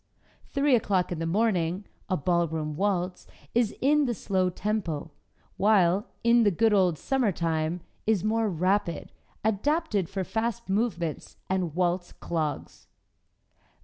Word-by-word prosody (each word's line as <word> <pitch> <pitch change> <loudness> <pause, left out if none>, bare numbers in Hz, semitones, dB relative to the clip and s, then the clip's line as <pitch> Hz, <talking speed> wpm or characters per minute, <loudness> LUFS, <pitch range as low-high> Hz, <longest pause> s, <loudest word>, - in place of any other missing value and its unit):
"Three 280 -1 +3
o'Clock 195 -6 +1
in 175 - -3
the 165 - -2
Morning," 185 -1 +1 0.2
a 185 - +1
ballroom 160 -2 0
waltz 185 -1 -1 0.3
is 230 -2 +1
in 295 +2 +4
the 240 - -1
slow 185 -2 0
tempo, 175 -6 -3 0.5
while 195 -1 +3 0.2
"In 235 +1 +5
the 215 - +5
Good 215 +4 +2
Old 185 -5 +3
Summertime" 170 - 0 0.3
is 215 -5 +2
more 220 0 +1
rapid, 185 0 0 0.3
adapted 220 - 0
for 195 -1 -2
fast 230 +3 -2
movements 190 -6 -2
and 180 -5 -1
waltz 175 0 0
clogs. 155 -4 -4
190 Hz, 125 wpm, -27 LUFS, 170-220 Hz, 0.5 s, In